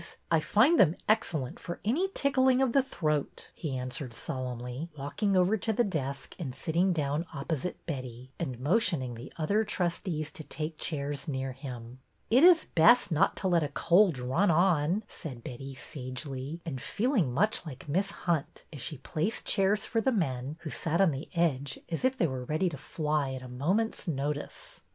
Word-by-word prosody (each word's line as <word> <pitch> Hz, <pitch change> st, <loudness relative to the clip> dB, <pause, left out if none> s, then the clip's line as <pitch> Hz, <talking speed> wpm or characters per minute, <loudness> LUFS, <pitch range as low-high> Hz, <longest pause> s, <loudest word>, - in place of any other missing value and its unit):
I 165 Hz, -, +5 dB
find 225 Hz, -, +4 dB
them 170 Hz, -2 st, +6 dB
excellent 160 Hz, -, 0 dB
for 175 Hz, -, -6 dB
any 300 Hz, -, +2 dB
tickling 260 Hz, -2 st, +3 dB
of 265 Hz, -2 st, +3 dB
the 275 Hz, -, +6 dB
throat," 155 Hz, -, -2 dB
he 140 Hz, -5 st, -4 dB
answered 125 Hz, 0 st, -5 dB
solemnly, 125 Hz, +4 st, -4 dB
walking 190 Hz, +8 st, 0 dB
over 185 Hz, +4 st, +4 dB
to 220 Hz, +2 st, -1 dB
the 230 Hz, +3 st, +2 dB
desk 140 Hz, -, -3 dB
and 135 Hz, -7 st, -4 dB
sitting 170 Hz, +7 st, +1 dB
down 150 Hz, 0 st, -1 dB
op 140 Hz, +2 st, -6 dB
posite 160 Hz, +2 st, -1 dB
Betty, 130 Hz, -4 st, -6 dB
and 130 Hz, -8 st, -3 dB
motioning 145 Hz, -, +2 dB
the 120 Hz, +3 st, -9 dB
other 200 Hz, +7 st, +2 dB
trustees 170 Hz, -6 st, -2 dB
to 170 Hz, -5 st, -8 dB
take 155 Hz, +1 st, -5 dB
chairs 145 Hz, -1 st, -2 dB
near 135 Hz, -2 st, -2 dB
him. 125 Hz, -2 st, -8 dB
'' -, -, -42 dB
It 255 Hz, +6 st, +6 dB
is 350 Hz, -2 st, +7 dB
best 175 Hz, +8 st, +5 dB
not 170 Hz, +5 st, +3 dB
to 190 Hz, -, -1 dB
let 175 Hz, -2 st, +3 dB
a 150 Hz, -, 0 dB
cold 175 Hz, +3 st, +4 dB
run 130 Hz, +11 st, +1 dB
on," 170 Hz, +2 st, +3 dB
said 130 Hz, -, -8 dB
Betty, 135 Hz, +2 st, -7 dB
sagely, 130 Hz, +4 st, -6 dB
and 135 Hz, -7 st, -4 dB
feeling 220 Hz, -, +1 dB
much 205 Hz, -, +1 dB
like 145 Hz, -3 st, -9 dB
Miss 190 Hz, +7 st, +1 dB, 0.2 s
Hunt 165 Hz, -5 st, -1 dB
as 140 Hz, -, -7 dB
she 150 Hz, -, -3 dB
placed 160 Hz, -, -2 dB
chairs 200 Hz, +1 st, +2 dB
for 225 Hz, -, 0 dB
the 265 Hz, -, +2 dB
men, 140 Hz, -, -1 dB
who 155 Hz, -, -6 dB
sat 165 Hz, +1 st, 0 dB
on 195 Hz, -4 st, +5 dB
the 135 Hz, +2 st, -6 dB
edge 145 Hz, -5 st, +1 dB
as 165 Hz, -, -2 dB
if 260 Hz, 0 st, +2 dB
they 175 Hz, -, +3 dB
were 130 Hz, -4 st, -3 dB
ready 155 Hz, +7 st, +1 dB
to 160 Hz, -, -6 dB
fly 150 Hz, -1 st, -1 dB
at 130 Hz, -1 st, -6 dB
a -, -, -8 dB
moment's 180 Hz, -, -1 dB
notice. 145 Hz, -1 st, -4 dB
155 Hz, 185 wpm, -30 LUFS, 135-190 Hz, 0.2 s, is